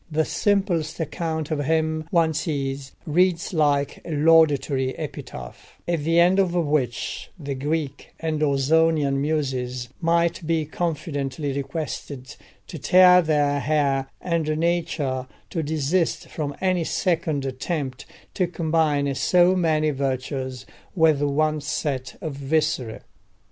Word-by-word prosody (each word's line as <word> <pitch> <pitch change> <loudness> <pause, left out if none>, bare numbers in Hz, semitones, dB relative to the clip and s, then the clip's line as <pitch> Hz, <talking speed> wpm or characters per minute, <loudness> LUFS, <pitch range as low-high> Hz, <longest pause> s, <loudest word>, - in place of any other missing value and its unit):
The 160 0 +1
simplest 185 -7 0
account 160 -1 -3
of 145 -2 -1
him, 160 0 0
one 165 -3 +2
sees, 140 -3 -3
reads 175 +3 +1
like 145 -3 +1
a - - -10
laudatory 145 -4 +3
epitaph, 60 0 -8
at 170 -1 0
the 165 +2 +3
end 180 +3 +5
of 180 -2 +1
which 145 -8 -1
the 145 -4 -4
Greek 145 +1 -3
and 160 -2 -2
Ausonian 145 0 +2
Muses 130 -5 -2
might 170 0 +1
be 165 -2 +1
confidently 145 -4 -3
requested 140 -2 -5 0.3
to - - -8
tear 180 0 +7
their 145 -3 +1
hair, 140 -1 +1
and 160 -3 -1
Nature 160 -6 -1 0.2
to 165 - -1
desist 160 +3 -1
from 145 -3 -4
any 185 -2 +1
second 160 -5 0
attempt 135 0 -4 0.3
to 180 - 0
combine 155 -4 +1
so 180 +6 +4
many 155 -4 +2
virtues 130 -1 -3 0.3
with 160 -4 +4
one 150 +1 +1
set 140 -3 -3
of 155 -3 -4
viscera. 135 -6 -1
155 Hz, 120 wpm, -24 LUFS, 140-165 Hz, 0.3 s, tear